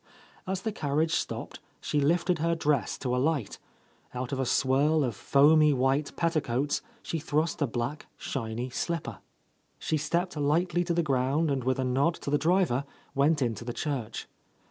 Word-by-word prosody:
As 190 0 -2
the 220 - -1
carriage 155 -2 0
stopped - - -3 0.2
she 145 - 0
lifted 170 +3 +2
her 165 +1 +1
dress 150 -6 0
to 125 -2 -1
alight; 135 -4 0 0.6
out 125 +2 -3
of 135 - -2
a 130 - 0
swirl 140 +5 +3
of 120 -5 -2
foamy 150 +4 +5
white 135 +3 +1
petticoats 145 -5 0 0.2
she 165 - -3
thrust 155 +2 -1
a 145 - +3
black, 120 +5 -4
shiny 120 0 -4
slipper. 165 +4 -3 0.6
She 155 - -1
stepped 170 +4 -1
lightly 165 +4 +1
to 170 -1 0
the 170 - +2
ground 140 +3 +1
and 135 -2 -1
with 130 +1 +1
a 130 - 0
nod 135 +7 +2
to 140 - -4
the 145 - +3
driver 165 -5 +2 0.3
went 145 +1 +3
into 115 -2 -2
the 120 0 -4
church. 125 -7 -4
145 Hz, 165 wpm, -28 LUFS, 130-160 Hz, 0.6 s, foamy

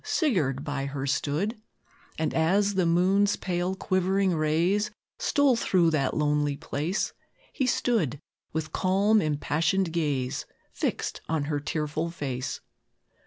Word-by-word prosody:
Sigurd 155 - +1
by 145 -2 -3
her 140 -1 -4
stood; 155 - -1 0.6
And 160 -2 -1
as 195 +6 +2
the 185 -3 +2
moon's 190 +4 +3
pale, 180 0 -2
quivering 190 0 +1
rays 170 +7 +1 0.3
Stole 285 -4 +3
through 180 -7 +3
that 140 -4 0
lonely 150 -1 +1
place, 165 +4 -2 0.4
He 265 - 0
stood, 215 - +1 0.3
with 160 -1 -3
calm, 200 +3 +3
impassioned 160 +4 0
gaze 140 -6 -1 0.3
Fixed - - -2
on 160 -2 0
her 145 0 -1
tearful 150 +2 -2
face. 135 -6 -4
165 Hz, 120 wpm, -27 LUFS, 145-195 Hz, 0.6 s, moon's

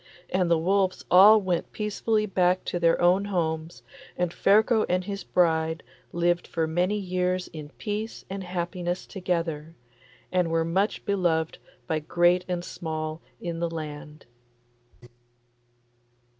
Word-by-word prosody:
And 185 -2 +1
the 170 - +4
wolves 190 +3 +1
all 205 +4 +8
went 185 -4 -2
peacefully 215 +1 0
back 185 -2 +1
to 175 - -2
their 165 -1 +3
own 180 +3 +3
homes, 165 -4 -2 0.3
and 175 -1 -1
Ferko 220 +3 +4
and 180 +1 +1
his 200 +1 -5
bride 160 -2 +1 0.3
lived 175 0 0
for 165 -2 -1
many 180 +6 0
years 185 -1 -1
in 155 -2 -9
peace 215 +1 -4
and 195 0 -5
happiness 175 0 -3
together, 165 -4 -3 0.6
and 180 -2 +1
were 165 0 +1
much 190 +5 0
beloved 175 -6 0 0.3
by 160 - -1
great 175 +3 +2
and 175 -1 -3
small 155 -1 -5 0.2
in 170 -1 -4
the 170 0 -1
land. 150 -2 -7
175 Hz, 130 wpm, -26 LUFS, 165-190 Hz, 0.6 s, all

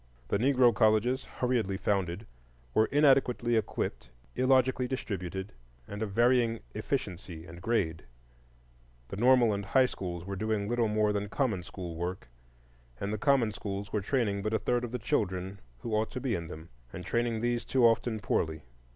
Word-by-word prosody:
The 100 - +1
Negro 125 -1 +4
colleges, 115 +4 +2
hurriedly 115 -6 -1
founded, 95 0 -1 0.5
were 110 - +4
inadequately 135 -5 +3
equipped, 105 - -2 0.3
illogically 130 0 +3
distributed, 95 -6 -4 0.4
and 100 +1 -6
of 110 - -1
varying 120 +1 +2
efficiency 85 -2 -4
and 85 +1 -11
grade; 85 -7 0 1.1
the - - -5
normal 120 0 +5
and 100 0 -2
high 130 +6 +4
schools 90 -7 -5
were 100 +1 -4
doing 105 0 -1
little 120 0 +1
more 105 0 +2
than 100 0 -2
common 110 -7 0
school 90 -1 -7
work, 90 -2 -4 0.7
and 100 +1 -2
the 110 - -3
common 135 -5 +3
schools 100 -1 -5
were 105 - +1
training 105 -3 0
but 110 +2 -1
a - - +4
third 120 +1 0
of 120 - -4
the 125 - -2
children 95 -3 -2 0.2
who 115 - -4
ought 110 +1 +1
to 125 - -3
be 125 -2 -1
in 85 -4 -3
them, 80 +1 -10 0.2
and 90 - -8
training 120 -1 0
these 120 0 0
too 130 -3 +3
often 115 -1 +2
poorly. 80 -6 -1
110 Hz, 170 wpm, -30 LUFS, 95-120 Hz, 1.1 s, normal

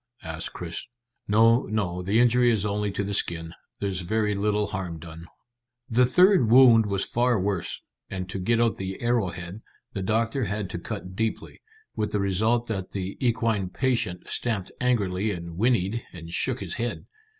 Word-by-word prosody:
asked 80 0 -4
Chris. 85 -1 -5 0.4
"No, 115 +4 +4
no. 95 -4 -1
The 100 +5 +2
injury 120 0 +4
is 110 -3 +1
only 105 0 -1
to 100 0 -2
the 100 +1 -3
skin. 85 -4 -1 0.3
There's 95 -2 -2
very 105 +3 0
little 105 +1 +1
harm 95 -4 -4
done." 80 +1 -10 0.6
The 125 +2 +4
third 180 - +5
wound 120 -3 +7
was 100 -1 0
far 120 -1 +1
worse, 95 -1 -2 0.3
and 95 -1 -4
to 95 +1 -5
get 115 +5 +1
out 115 -1 +2
the 95 0 -5
arrowhead 95 -5 -2 0.3
the 100 - -3
doctor 115 +5 0
had 105 -1 -3
to 85 - -4
cut 95 -1 -6
deeply, 110 +2 -3 0.3
with 105 -1 -2
the 105 - +1
result 110 +5 +1
that 95 -4 -3
the 95 0 -4
equine 115 -5 +1
patient 115 -6 -1
stamped 110 -6 -1
angrily 105 -5 +1
and 85 -4 -5
whinnied 115 +1 +1
and 85 -1 -9
shook - - 0
his - - -2
head. 120 - -3
105 Hz, 170 wpm, -26 LUFS, 95-115 Hz, 0.6 s, wound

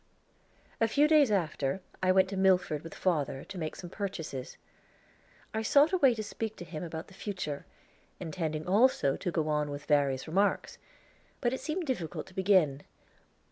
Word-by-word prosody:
A 225 - +4
few 285 +7 +4
days 300 -4 +5
after, 160 -6 0 0.2
I 185 0 +4
went 190 0 +4
to 195 - -4
Milford 185 -5 +2
with 165 - -9
father, 145 -6 0
to 195 - -9
make 155 -2 -3
some 175 -1 -9
purchases. 170 -11 -5 1.0
I 220 - -1
sought 285 +9 +4
a - - +4
way 265 -6 +5
to 215 - -4
speak 220 +1 -4
to 175 - -9
him 155 0 -6
about 160 -1 -5
the - - -16
future, 180 -8 -5 0.5
intending 160 -3 -3
also 195 - +3
to 185 - -3
go 160 -2 0
on 150 -1 0
with 145 0 -6
various 140 -3 +2
remarks; 195 +5 0 0.6
but 240 -1 0
it 260 - -2
seemed 335 +2 -2
difficult 180 - -3
to 190 - -16
begin. 185 -8 +3
185 Hz, 175 wpm, -30 LUFS, 155-215 Hz, 1.0 s, days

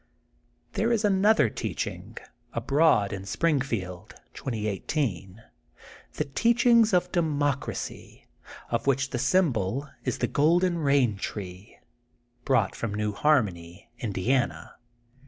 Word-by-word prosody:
There 225 +2 0
is 225 -2 +1
another 195 - +4
teaching, - - -5 0.4
abroad 140 -10 +2
in 95 -1 -5
Springfield, 110 - -2 0.2
2018, 110 - -3 0.7
the 150 - -2
teaching 235 - +3
of 180 -1 +1
Democ 145 -5 0
racy, - - -7 0.5
of - - -1
which 135 0 +1
the 125 - -2
Symbol 135 - +1 0.2
is - - -2
the - - 0
Golden 170 +3 +2
Bain 135 -7 +2
Tree 95 0 -7 0.7
brought 115 -7 +2
from 110 -3 -4
New 105 0 -1
Harmony, 100 - 0
In 115 -3 -3
diana. 95 -4 -1
130 Hz, 110 wpm, -27 LUFS, 100-160 Hz, 0.7 s, another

